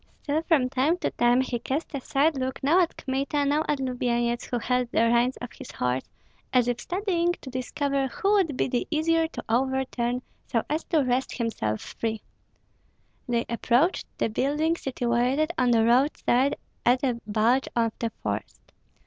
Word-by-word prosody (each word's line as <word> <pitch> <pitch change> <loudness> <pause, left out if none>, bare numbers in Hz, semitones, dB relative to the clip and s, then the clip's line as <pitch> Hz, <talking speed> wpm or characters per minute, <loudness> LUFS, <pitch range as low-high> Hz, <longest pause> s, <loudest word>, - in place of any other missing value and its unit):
Still 300 +2 0
from 320 -6 +2
time 270 +6 +1
to - - -2
time 240 +1 +3
he 255 -2 -2
cast 280 +8 -3
a 280 - -3
side 290 +4 +2
look 260 0 -3
now 325 +7 +5
at 340 - -1
Kmita, 275 +2 -1
now 295 +2 +2
at 295 -2 +1
Lubyenyets, 240 -2 -1
who 245 - -2
held 250 +1 0
the - - +3
reins 240 +2 +3
of 245 - -7
the 270 - -10
horse, 125 +1 -1 0.4
as 250 -2 +3
if 245 0 0
studying 350 -2 0
to 270 -6 -10
discover 275 +2 -1
who 390 +10 -1
would 365 -10 +2
be - - +1
the 245 -2 -1
easier 325 +1 +2
to 325 - -8
overturn 250 0 0 0.2
so 230 - 0
as 310 +2 0
to 315 -4 +2
wrest 255 +1 -1
himself 110 - -2
free. 220 -2 -4 1.1
They 235 -1 +1
approached 245 +8 +1
the - - 0
building 295 +8 +1
situated 255 +3 0
on 250 -1 +2
the 225 -2 +4
roadside 255 +1 +3 0.3
at 250 +2 +3
a 245 -3 0
bulge 225 +5 +2
of 230 -1 +2
the 230 - -1
forest. 105 0 -5
255 Hz, 175 wpm, -26 LUFS, 240-295 Hz, 1.1 s, now